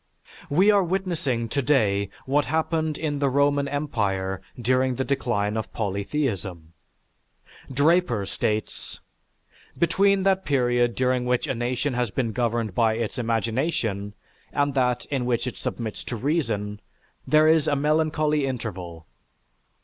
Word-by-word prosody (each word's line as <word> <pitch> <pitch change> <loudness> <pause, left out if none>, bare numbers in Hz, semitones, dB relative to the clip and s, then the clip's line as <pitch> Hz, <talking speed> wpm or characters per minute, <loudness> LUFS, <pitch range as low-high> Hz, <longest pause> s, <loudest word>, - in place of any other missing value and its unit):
We 185 +8 +5
are 200 -2 +4
witnessing 170 -10 -1
today 110 -7 +1 0.2
what 145 +2 +2
happened 160 +1 0
in 145 -3 -2
the 140 -1 +2
Roman 140 +1 +2
empire 100 -10 -1 0.2
during 130 +2 +2
the 130 - -1
decline 110 -6 0
of 110 - -3
polytheism. 100 - -3 1.0
Draper 145 - +2
states: 105 +2 -3 0.8
"Between 195 +3 +3
that 190 0 +2
period 120 -3 +2
during 125 -1 +1
which 125 0 +1
a - - -1
nation 125 +3 -1
has 125 -2 0
been 115 +3 -1
governed 115 -3 -1
by 110 +1 +2
its 115 +2 -3
imagination, 115 -3 -1 0.4
and 145 -1 +1
that 125 -2 +1
in 130 -3 -1
which 120 -1 0
it 125 - -4
submits 110 -3 -4
to 125 - -4
reason, 115 -7 -1 0.5
there 155 0 +5
is 160 -1 +4
a 145 - +2
melancholy 150 0 +1
interval. 90 -10 -5
125 Hz, 130 wpm, -25 LUFS, 110-150 Hz, 1.0 s, We